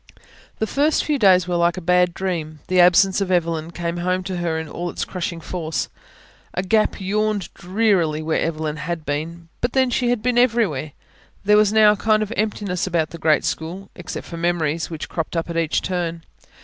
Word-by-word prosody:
The 220 - 0
first 290 +7 +1
few 295 -2 0
days 185 -4 +5
were 175 -1 0
like 170 +1 +2
a - - -1
bad 180 0 +2
dream. 160 -5 -3
The 185 0 +3
absence 185 +2 +5
of 195 - -1
Evelyn 165 -3 0
came 170 0 -4
home 185 +1 -1
to 185 -1 -4
her 170 -2 -1
in 160 0 -4
all 175 +4 -4
its - - -3
crushing 175 -2 -4
force. 165 -1 -3 0.7
A 180 - 0
gap 215 +3 +1
yawned 205 0 -1
drearily 180 -5 +1
where 160 0 0
Evelyn 155 -2 -2
had 160 +1 -4
been 165 +4 -4
but 240 0 -1
then, 260 -2 +2
she 245 0 +1
had 240 -3 0
been 245 -1 +2
everywhere. 210 - +1 0.5
There 210 +1 +5
was 210 -1 +5
now 215 -1 +6
a - - +1
kind 215 0 +2
of 215 +2 -5
emptiness 205 -4 -1
about 165 -3 0
the 170 - -8
great 155 -1 +3
school 180 +5 -4
except 180 - -7
for 170 - -8
memories, 165 -2 0
which 160 -2 -6
cropped 165 0 -3
up 165 +1 -2
at - - -5
each 165 -2 0
turn. 170 -2 -2
175 Hz, 200 wpm, -21 LUFS, 165-205 Hz, 0.7 s, now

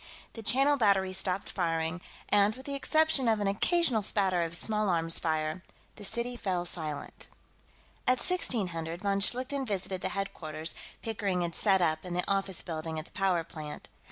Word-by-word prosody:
The 225 - -7
Channel 270 +6 +4
Battery 195 -5 +3
stopped 190 0 -1
firing, 165 -1 -1 0.3
and, 205 +1 +4
with 260 - -11
the 280 - -4
exception 300 -1 +2
of 220 -2 +3
an 205 - -1
occasional 240 - +2
spatter 190 -3 +1
of 170 0 -1
small 215 0 +1
arms 165 -1 +2
fire, 155 +1 -1 0.3
the 210 - -11
city 235 +4 0
fell 185 -6 -2
silent. 155 -5 -5 0.8
At 255 - +5
1600, 180 - 0
von 200 -1 +1
Schlichten 255 +6 +2
visited 195 -5 -3
the - - -1
headquarters 160 -5 -4 0.3
Pickering 205 -5 -1
had 170 -1 -2
set 190 -2 +3
up 155 -2 +1
in 180 -1 -5
the 180 - -1
office 195 -2 0
building 160 -1 -4
at 155 - -4
the - - -19
power 185 -3 +1
plant. 155 -2 -8
195 Hz, 170 wpm, -30 LUFS, 170-220 Hz, 0.8 s, At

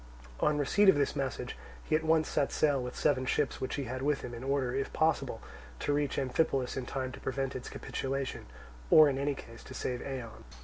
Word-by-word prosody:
On 150 0 +2
receipt 195 +8 +4
of - - +7
this 145 0 +1
message 135 -3 -3 0.3
he - - +1
at 160 - +1
once 160 0 +3
set 140 - 0
sail 145 -3 +2
with 125 0 -5
seven 130 -3 +2
ships 135 +2 0
which 130 - -2
he 140 - -2
had 130 +1 -4
with 145 +1 +1
him, 120 - -6
in 120 +1 -7
order, 135 -2 0
if 135 +1 -1
possible, 160 0 +1 0.4
to 145 - 0
reach 145 -1 0
Amphipolis 135 -1 +1
in 130 -2 -4
time 130 -1 -3
to - - -9
prevent 135 0 -2
its 130 - -5
capitulation, 135 - -4 0.4
or 155 -1 +9
in 135 -1 -1
any 140 0 0
case 115 -3 -11
to - - -9
save 125 -1 -2
Eion. 125 -5 -6
135 Hz, 215 wpm, -31 LUFS, 130-145 Hz, 0.4 s, or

